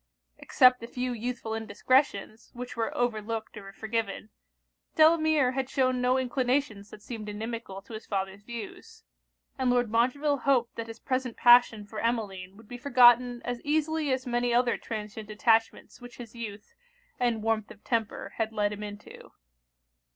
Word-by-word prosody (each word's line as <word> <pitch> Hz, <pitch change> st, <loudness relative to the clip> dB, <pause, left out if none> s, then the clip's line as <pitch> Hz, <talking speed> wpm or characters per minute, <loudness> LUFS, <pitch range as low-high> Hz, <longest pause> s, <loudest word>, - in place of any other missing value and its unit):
Except 250 Hz, -1 st, +4 dB
a 230 Hz, -, -7 dB
few 250 Hz, +1 st, -3 dB
youthful 235 Hz, -1 st, -4 dB
indiscretions, 225 Hz, 0 st, 0 dB
which 245 Hz, +1 st, -7 dB
were 225 Hz, -1 st, -1 dB
overlooked 225 Hz, -2 st, -2 dB
or 195 Hz, -2 st, -9 dB
forgiven, 220 Hz, 0 st, -4 dB, 0.6 s
Delamere 315 Hz, -4 st, +4 dB
had 260 Hz, 0 st, -3 dB
shewn 255 Hz, -2 st, +1 dB
no 250 Hz, +1 st, +3 dB
inclinations 255 Hz, -4 st, -1 dB
that 210 Hz, -, -13 dB
seemed 215 Hz, -3 st, -7 dB
inimical 215 Hz, -2 st, -6 dB
to 225 Hz, -, -13 dB
his 220 Hz, -, -8 dB
father's 195 Hz, 0 st, -3 dB
views; 230 Hz, -1 st, -9 dB, 0.6 s
and 260 Hz, -1 st, +1 dB
Lord 245 Hz, -3 st, +1 dB
Montreville 275 Hz, +5 st, +1 dB
hoped 250 Hz, -3 st, +1 dB
that 230 Hz, 0 st, -5 dB
his 225 Hz, 0 st, -9 dB
present 255 Hz, -2 st, -2 dB
passion 240 Hz, -3 st, +6 dB
for 210 Hz, +1 st, -7 dB
Emmeline 200 Hz, -5 st, -3 dB
would 225 Hz, 0 st, -16 dB
be 245 Hz, +2 st, -8 dB
forgotten 245 Hz, -2 st, +5 dB
as 245 Hz, 0 st, -3 dB
easily 310 Hz, 0 st, 0 dB
as 260 Hz, -1 st, -1 dB
many 240 Hz, 0 st, 0 dB
other 240 Hz, 0 st, +3 dB
transient 215 Hz, -1 st, -7 dB
attachments 225 Hz, +3 st, +1 dB
which 245 Hz, 0 st, -12 dB
his 235 Hz, -3 st, -10 dB
youth, 215 Hz, -3 st, -8 dB, 0.5 s
and 235 Hz, -3 st, 0 dB
warmth 220 Hz, -1 st, 0 dB
of 205 Hz, -, -14 dB
temper, 225 Hz, -3 st, -2 dB
had 225 Hz, -1 st, -1 dB
led 210 Hz, -1 st, 0 dB
him 210 Hz, -, -8 dB
into. 205 Hz, 0 st, -10 dB
235 Hz, 160 wpm, -28 LUFS, 215-250 Hz, 0.6 s, passion